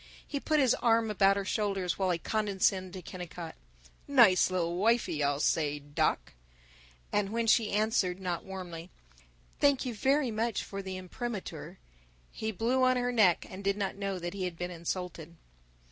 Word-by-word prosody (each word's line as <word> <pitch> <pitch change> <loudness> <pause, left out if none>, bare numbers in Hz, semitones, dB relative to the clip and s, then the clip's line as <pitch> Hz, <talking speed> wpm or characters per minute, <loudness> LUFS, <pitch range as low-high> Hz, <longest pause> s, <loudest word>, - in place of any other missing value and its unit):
He 285 - -3
put 310 +1 +1
his 260 -4 +4
arm 225 -2 +2
about 195 -1 +4
her 200 - -2
shoulder 195 -2 -1
while 190 -1 0
he 175 - +1
condescended 190 -2 0
to 185 - -7
Kennicott, 175 -2 -7 0.5
"Nice 230 -12 +6
lil 175 -2 -1
wifey, 215 -5 +1
I'll 140 0 +1
say, 150 -1 +1
doc," 145 0 -1 0.8
and 205 -1 +1
when 230 +2 -1
she 225 -1 +3
answered, 205 -4 +1
not 180 -3 -3
warmly, 180 -3 -7 0.7
"Thank 280 -2 +3
you 250 - -2
very 265 +3 +1
much 225 0 -1
for 195 0 -6
the 190 -1 -5
imprimatur," 200 +3 -6 0.5
he 220 0 -3
blew 235 +6 0
on 255 0 +4
her 245 0 0
neck, 210 -8 +4
and 190 +2 -9
did 200 +1 +1
not 195 -2 -2
know 195 -1 -3
that 175 0 -5
he 195 -2 -3
had 175 -2 -5
been 180 +1 -4
insulted. 170 -1 -5
195 Hz, 170 wpm, -30 LUFS, 180-225 Hz, 0.8 s, Nice